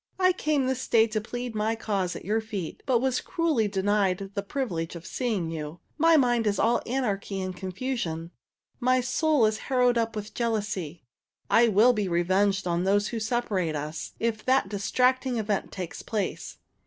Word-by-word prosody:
"I 370 -1 +4
came 300 -6 0
this 260 0 -2
day 225 -1 +5
to 215 -1 -2
plead 245 +2 -5
my 215 +1 0
cause 200 -5 -2
at - - -8
your 215 +3 +1
feet, 205 -7 -6
but 245 -3 +3
was 260 -1 +1
cruelly 310 -10 0
denied 195 -1 0
the 200 - -1
privilege 195 -8 -3
of 170 0 -9
seeing 200 -7 -2
you. 155 +1 -6 0.2
My 330 +1 +6
mind 240 -5 +2
is 205 - +1
all 235 +2 +2
anarchy 205 -6 -2
and 185 -1 -4
confusion. 185 -4 -4 0.5
My 255 0 +3
soul 260 +1 +2
is 215 0 0
harrowed 250 -2 +3
up 225 -1 -1
with 210 0 -6
jealousy. 205 -8 -2 0.5
I 235 +1 +6
will 225 +4 +5
be 210 -4 -1
revenged 190 +3 +1
on 175 0 0
those 200 +2 +2
who 230 - -3
separate 215 -8 -1
us, 150 +2 -5
if 225 -2 -1
that 260 -6 +3
distracting 250 +5 +1
event 210 -2 -1
take 180 -3 -6
place. 215 -3 -3
215 Hz, 175 wpm, -27 LUFS, 190-245 Hz, 0.5 s, My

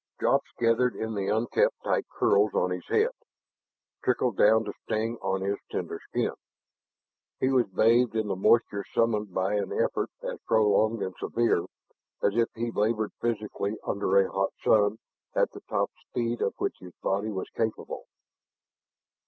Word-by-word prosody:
Drops - - +2
gathered 120 +1 +2
in 110 0 -3
the 100 -2 -2
unkempt 110 +2 +2
tight - - 0
curls 100 0 +2
on 90 - +2
his 90 -1 -4
head, 450 +3 +2 0.9
trickled 125 -3 +1
down 110 +3 +5
to - - -5
sting 115 +2 -2
on 95 0 -1
his 100 +1 -1
tender - - -4
skin. - - 0 1.1
He 130 - +2
was 130 -3 +3
bathed 115 +5 +3
in 110 -1 0
the 100 - -1
moisture 100 +1 +3
summoned 105 -3 +1
by 95 +3 0
an 100 -2 -1
effort - - 0
as - - -4
prolonged 110 0 +3
and 95 -1 -4
severe 115 -7 +1 0.6
as 100 - +2
if 115 -1 +2
he 115 +1 -2
labored 110 0 0
physically 110 -2 -2
under 100 -1 +1
a 95 -1 +3
hot 95 0 0
sun 105 0 +4 0.4
at - - +2
the - - -11
top - - 0 0.2
speed 120 0 -2
of - - 0
which - - -2
his 90 -1 -12
body 100 +3 0
was 95 -3 -4
capable. 110 -1 -3
110 Hz, 160 wpm, -28 LUFS, 100-115 Hz, 1.1 s, down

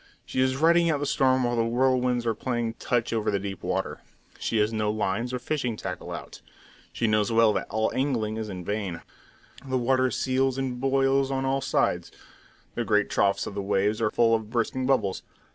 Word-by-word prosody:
She 130 - -1
is 130 0 +2
riding 170 +4 +4
out 150 -3 +1
the 145 - -2
storm 130 -2 +2
while 120 0 0
the 115 - +2
whirlwinds 125 0 +1
are 115 - +1
playing 120 0 -2
touch 120 -2 0
over 110 -2 0
the 100 - +1
deep 100 -1 -5
water. - - -2 0.4
She 115 - -1
has 105 +1 +2
no 105 -1 0
lines 110 +3 -1
or 125 - -1
fishing 125 -3 -2
tackle 95 -2 -6
out; - - -8 0.5
she 120 - -2
knows 110 -1 +2
well 115 -1 +5
that - - -3
all 110 +1 0
angling 115 -6 -1
is 110 -1 -4
in 90 -3 -7
vain. 100 -5 -3 0.6
The 130 -1 -1
water 130 +1 +2
seethes 130 +1 0
and 130 -2 -2
boils 135 0 +2
on 135 -1 -1
all 135 +1 0
sides; - - 0 0.6
the 120 - -2
grey 105 -2 +3
troughs 100 0 +1
of - - -6
the 100 - -3
waves 100 +2 0
are 110 - +2
full 115 0 +3
of 110 -2 0
bursting 125 +2 -1
bubbles. 110 -8 +1
120 Hz, 200 wpm, -26 LUFS, 105-130 Hz, 0.6 s, well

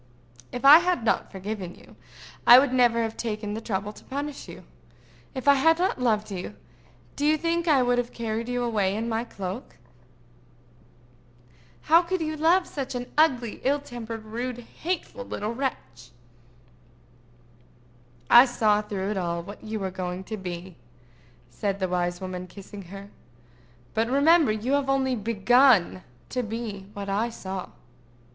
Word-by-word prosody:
"If 245 +2 -5
I 295 +4 +11
had 355 -7 0
not - - 0
forgiven 195 -2 -6
you, - - -18 0.5
I 240 - +11
would 260 0 +3
never 240 -2 +3
have 225 0 -4
taken 215 -2 -4
the 220 - -4
trouble 205 -1 -3
to - - -15
punish 285 +1 -5
you. - - -10 0.7
If 260 +1 -5
I 280 - +9
had 325 +4 +4
not 355 -7 0
loved 215 -3 +1
you, 180 - -6 0.6
do - - -4
you 305 +1 +4
think 335 +2 -1
I 280 -5 +4
would 245 0 +2
have 245 -1 -3
carried 230 0 -4
you 245 0 -1
away 205 -5 0
in 225 +2 -2
my 225 0 -1
cloak?" 200 0 -7 2.1
"How 330 +3 +6
could 365 +2 -2
you 310 -1 -2
love 335 +4 +3
such 270 -3 -5
an 245 0 -5
ugly, 255 -8 +2
ill 280 +3 +2
tempered, 230 -5 -7
rude, 240 +3 -4 0.2
hateful 330 -7 -3
little 215 -2 -4
wretch?" 130 - -5 2.2
"I 240 +2 +9
saw, 215 -4 +2
through 200 -1 -4
it 210 - -2
all, 170 -2 -2
what 205 +4 -11
you 220 0 -4
were 190 -1 -3
going 185 0 -5
to 220 - -5
be," 180 -3 -7 0.7
said 195 +10 -2
the 190 - 0
wise 175 -1 -1
woman, 185 -1 -6
kissing 200 +2 -11
her. 195 +3 -10 0.8
"But 225 +1 0
remember 290 +1 +4
you 220 +4 -2
have 285 -1 +2
yet 270 - +3
only 265 -1 +1
begun 230 -2 +3 0.3
to 250 - -1
be 220 -4 -6
what 200 -1 -5
I 205 +4 0
saw." 190 -4 -6
230 Hz, 160 wpm, -26 LUFS, 200-265 Hz, 2.2 s, I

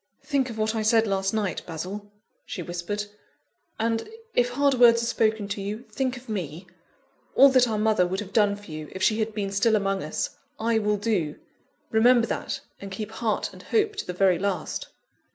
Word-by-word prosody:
"Think 275 -3 0
of 225 - -7
what 215 0 0
I 220 - -1
said 220 +1 +4
last 195 -2 0
night, 210 -4 -1
Basil," 190 +5 -6 0.3
she 180 - -6
whispered, 175 +5 -3 0.7
"and, 225 - 0 0.2
if 245 0 +3
hard 280 +3 +2
words 235 -2 +6
are - - 0
spoken 220 -3 +1
to 205 0 -3
you, 210 +4 -4
think 260 +2 -1
of 245 - -13
me. 180 -5 -4 0.7
All 275 - +9
that 255 -2 +5
our 220 -2 -1
mother 210 -4 +3
would 190 +2 -2
have 200 -1 -7
done 205 -2 +4
for 205 -4 -12
you, 155 -1 -6
if 190 - -4
she 215 +2 +3
had 220 -1 -1
been 200 -2 -2
still 210 +3 +3
among 195 -2 0
us, 155 - -2 0.3
I 225 0 +2
will 210 -1 +1
do. 195 -8 0 0.6
Remember 235 +1 +5
that, - - -3 0.2
and 200 - -7
keep 210 +2 -5
heart 225 -1 -1
and - - -12
hope 430 -1 +1
to - - -4
the - - -2
very 180 -2 +3
last." 195 -1 -2
215 Hz, 200 wpm, -26 LUFS, 195-230 Hz, 0.7 s, All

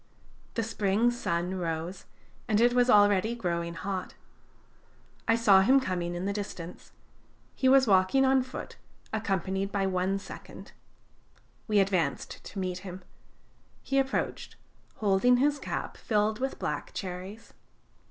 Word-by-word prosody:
The 230 - 0
spring 220 +1 +1
sun 180 -6 -2
rose, 170 +2 -4 0.4
and 215 -2 +2
it 240 +1 +4
was 245 0 +3
already 205 0 +4
growing 170 -5 -2
hot. 185 +1 -4 1.1
I 225 - +4
saw 205 -5 +6
him 265 +8 +5
coming 175 -7 -2
in 175 +2 -3
the 200 - -1
distance. 180 -4 -7 0.6
He 260 - +2
was 270 0 +6
walking 195 +6 +4
on 265 0 +4
foot, 255 +1 -8 0.4
accompanied 195 -2 -1
by 200 -1 0
one 190 +1 0
second. 195 - -10 1.0
We 210 -2 +2
advanced 190 -3 -1
to 200 - -9
meet 185 -1 -2
him. 185 -1 -9 0.8
He 275 0 +1
approached, 270 0 -2 0.4
holding 215 +4 +3
his 290 +2 +2
cap - - -4
filled 215 0 0
with 265 +1 -2
black - - -4
cherries. 190 +4 -7
200 Hz, 135 wpm, -29 LUFS, 185-235 Hz, 1.1 s, saw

